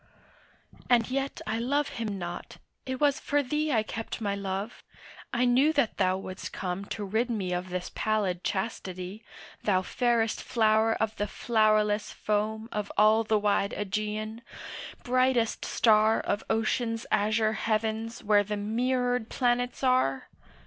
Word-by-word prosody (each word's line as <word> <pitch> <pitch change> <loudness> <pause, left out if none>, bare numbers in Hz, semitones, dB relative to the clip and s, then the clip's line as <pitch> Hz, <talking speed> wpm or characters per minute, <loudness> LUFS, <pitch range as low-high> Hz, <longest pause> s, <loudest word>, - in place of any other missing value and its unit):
And 240 -1 +3
yet 275 +1 -2
I 220 +1 -1
love 280 +4 0
him 215 -4 -4
not; 175 -1 -6 0.3
it 260 -1 -3
was 290 -2 +3
for 290 0 +1
thee 300 +3 -1
I 220 -5 +2
kept 225 +2 -5
my 205 -3 -1
love; 200 +2 -4 0.5
I 245 0 +2
knew 260 +5 +4
that 280 -8 +1
thou 185 -1 +2
would'st 190 0 -7
come 185 +1 -4
To 205 0 -5
rid 220 +5 0
me 200 -6 -2
of 180 +1 -3
this 180 0 -4
pallid 200 -5 0
chastity, 190 0 -4 0.4
Thou 185 -3 +2
fairest 235 +1 +1
flower 220 -1 +3
of 220 0 -1
the 205 - -1
flowerless 215 -2 +2
foam 215 +1 -1
Of 210 -1 -3
all 215 +2 +5
the 215 0 +2
wide 205 -1 +1
Ægean, 215 +2 -3 0.6
brightest 255 -2 +2
star 220 -1 +4
Of 205 - -2
ocean's 225 +1 0
azure 215 +1 +2
heavens 220 +2 -2
where 205 -1 +4
the 210 +1 -3
mirrored 245 +2 0
planets 245 0 0
are! 255 - +2
220 Hz, 145 wpm, -28 LUFS, 205-240 Hz, 0.6 s, all